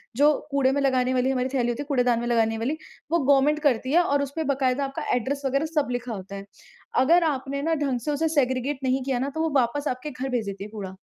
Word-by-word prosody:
जो 290 Hz, +4 st, +5 dB, 0.2 s
कूड़े 275 Hz, -2 st, +3 dB
में 285 Hz, +1 st, 0 dB
लगाने 260 Hz, -2 st, +2 dB
वाली 255 Hz, 0 st, +1 dB
हमारी 255 Hz, -1 st, 0 dB
थैली 245 Hz, -3 st, +1 dB
होती 240 Hz, +3 st, -2 dB
है, -, -, -14 dB
कूड़ेदान 245 Hz, -4 st, +2 dB
में 240 Hz, -, -3 dB
लगाने 225 Hz, -2 st, +2 dB
वाली, 255 Hz, +8 st, -2 dB, 0.3 s
वो 340 Hz, -, +3 dB
गवर्नमेंट 285 Hz, +1 st, +3 dB
करती 260 Hz, -4 st, +1 dB
है 345 Hz, -, +6 dB
और 285 Hz, -4 st, +1 dB
उस 275 Hz, -, -5 dB
पे 320 Hz, -, -1 dB
बाकायदा 265 Hz, 0 st, 0 dB
आपका 270 Hz, 0 st, -5 dB
एड्रैस 265 Hz, +4 st, -2 dB
वग़ैरह 275 Hz, +3 st, +1 dB
सब 295 Hz, -2 st, +2 dB
लिखा 245 Hz, -1 st, -3 dB
होता 195 Hz, -1 st, -7 dB
है, 195 Hz, 0 st, -7 dB, 0.5 s
अगर 330 Hz, +7 st, +5 dB
आपने 280 Hz, -2 st, -2 dB
ना 325 Hz, +3 st, 0 dB
ढंग 275 Hz, -5 st, -1 dB
से 270 Hz, +6 st, -3 dB
उसे 320 Hz, +3 st, 0 dB
सेग्रगेट 260 Hz, +1 st, -1 dB
नहीं 260 Hz, 0 st, +1 dB
किया 260 Hz, -2 st, -1 dB
ना 270 Hz, +3 st, -1 dB
तो 320 Hz, -, -1 dB
वो 325 Hz, -, +1 dB
वापस 275 Hz, +5 st, -1 dB
आपके 255 Hz, +4 st, -3 dB
घर 260 Hz, 0 st, -4 dB
भेज 245 Hz, -4 st, -1 dB
देती 200 Hz, -1 st, -5 dB
है 210 Hz, -, -8 dB
कूड़ा। 195 Hz, -3 st, -7 dB
265 Hz, 255 wpm, -25 LUFS, 245-285 Hz, 0.5 s, है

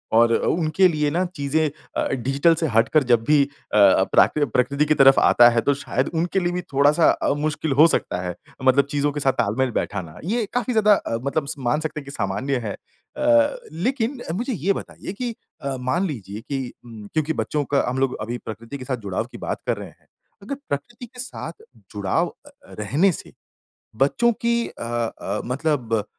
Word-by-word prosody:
और 115 Hz, +1 st, +5 dB
अ, -, -, -2 dB
उनके 170 Hz, +3 st, +3 dB
लिए 150 Hz, -3 st, 0 dB
ना 175 Hz, +3 st, +1 dB
चीज़ें 150 Hz, +2 st, 0 dB, 0.3 s
अ, -, -, +1 dB
डिजिटल 135 Hz, +6 st, +2 dB
से 160 Hz, 0 st, -1 dB
हटकर 120 Hz, +7 st, +4 dB
जब 115 Hz, -1 st, +3 dB
भी 150 Hz, -1 st, +5 dB
अ 140 Hz, -6 st, -5 dB
अ, 100 Hz, -2 st, +6 dB
प्राकृ 150 Hz, -1 st, +4 dB
प्रकृति 140 Hz, +3 st, +1 dB
की 155 Hz, -, +3 dB
तरफ 135 Hz, 0 st, +7 dB
आता 120 Hz, 0 st, +6 dB
है, 115 Hz, -1 st, +1 dB
तो 140 Hz, +5 st, +2 dB
शायद 140 Hz, -, -2 dB
उनके 170 Hz, +4 st, 0 dB
लिए 175 Hz, -1 st, 0 dB
भी 180 Hz, -, -2 dB
थोड़ा-सा 145 Hz, +4 st, +4 dB
अ, -, -, 0 dB
मुश्किल 150 Hz, 0 st, -2 dB
हो 165 Hz, -, +9 dB
सकता 90 Hz, -, -1 dB
है, 90 Hz, -1 st, -4 dB, 0.3 s
मतलब 130 Hz, +1 st, +4 dB
चीज़ों 145 Hz, 0 st, +1 dB
के 145 Hz, -, -4 dB
साथ 135 Hz, -2 st, +2 dB
तालमेल 125 Hz, +5 st, 0 dB
बैठाना। 90 Hz, -5 st, -5 dB
ये 220 Hz, +5 st, 0 dB
काफ़ी 245 Hz, 0 st, 0 dB
ज़्यादा 210 Hz, -1 st, +5 dB
अ, 115 Hz, -, -3 dB
मतलब 140 Hz, +1 st, -1 dB
स -, -, -4 dB
मान 150 Hz, -, +2 dB
सकते 155 Hz, -1 st, -4 dB
हैं 140 Hz, -, -11 dB
कि 140 Hz, -, -8 dB
सामान्य 125 Hz, +6 st, -2 dB
है। 105 Hz, -, -3 dB, 0.4 s
अ, 295 Hz, +6 st, +3 dB
लेकिन 245 Hz, -, -1 dB
अ, 165 Hz, -, -1 dB
मुझे 245 Hz, +7 st, -2 dB
ये 195 Hz, +1 st, +1 dB
बताइए 185 Hz, -, -7 dB
कि 235 Hz, +2 st, -4 dB, 0.3 s
अ, 135 Hz, -1 st, -3 dB
मान 130 Hz, +10 st, 0 dB
लीजिए 110 Hz, -, -6 dB
कि 135 Hz, 0 st, -4 dB
ऊँ, 110 Hz, -3 st, -10 dB
क्योंकि 155 Hz, 0 st, 0 dB
बच्चों 150 Hz, -1 st, -1 dB
का 140 Hz, -, +4 dB
हम 125 Hz, -, -3 dB
लोग 135 Hz, -1 st, +1 dB
अभी 120 Hz, +3 st, -3 dB
प्रकृति 115 Hz, +5 st, -7 dB
के 130 Hz, -, -9 dB
साथ 130 Hz, -1 st, -2 dB
जुड़ाव 95 Hz, -, -1 dB
की -, -, -9 dB
बात -, -, -4 dB
कर -, -, +1 dB
रहे -, -, -7 dB
हैं, -, -, -25 dB, 0.3 s
अगर 230 Hz, +8 st, -5 dB
प्रकृति 235 Hz, -, -5 dB
के 250 Hz, +1 st, -16 dB
साथ 265 Hz, -, -7 dB, 0.3 s
जुड़ाव -, -, 0 dB, 0.2 s
अ, 290 Hz, -, -13 dB, 0.3 s
रहने 145 Hz, -, +2 dB
से, -, -, -9 dB, 0.6 s
बच्चों 235 Hz, -, +3 dB
की 235 Hz, 0 st, +3 dB
अ -, -, -11 dB
अ, 115 Hz, -1 st, -3 dB
मतलब 125 Hz, -5 st, -1 dB
145 Hz, 205 wpm, -23 LUFS, 120-175 Hz, 0.6 s, हो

